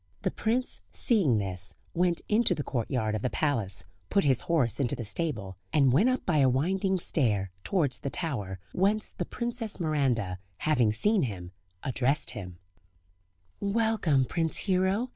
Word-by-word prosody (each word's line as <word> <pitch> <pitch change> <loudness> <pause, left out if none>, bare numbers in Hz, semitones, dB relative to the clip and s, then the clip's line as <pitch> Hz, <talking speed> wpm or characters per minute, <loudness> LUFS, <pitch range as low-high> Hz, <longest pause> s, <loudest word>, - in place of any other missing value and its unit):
The - - +1
prince, 245 +3 +1
seeing 190 - +3
this, 95 -2 -1 0.2
went 175 0 +1
into 210 -3 +3
the 145 - -3
courtyard 120 -4 -1
of 110 - -2
the 125 - 0
palace, 115 - 0 0.3
put 200 - +3
his 130 -3 +3
horse 145 -9 +1
into 130 -4 0
the 120 - -5
stable, 105 - -3
and 140 -5 +4
went 200 - +4
up 255 - -1
by 165 -4 +2
a 135 -2 +5
winding 190 +9 +1
stair, 105 - +1
towards 150 -10 0
the 140 - -3
tower, 105 - -3 0.2
whence 205 +3 +1
the - - -4
Princess 235 -3 -3
Miranda, 130 - 0 0.2
having 125 -8 +2
seen 205 - +2
him, 95 -8 -4 0.3
addressed 130 +2 0
him: 90 -4 -8 1.0
"Welcome, 200 - +2
Prince 165 +3 -1
Hero! 190 +5 +1
145 Hz, 155 wpm, -28 LUFS, 115-190 Hz, 1.0 s, a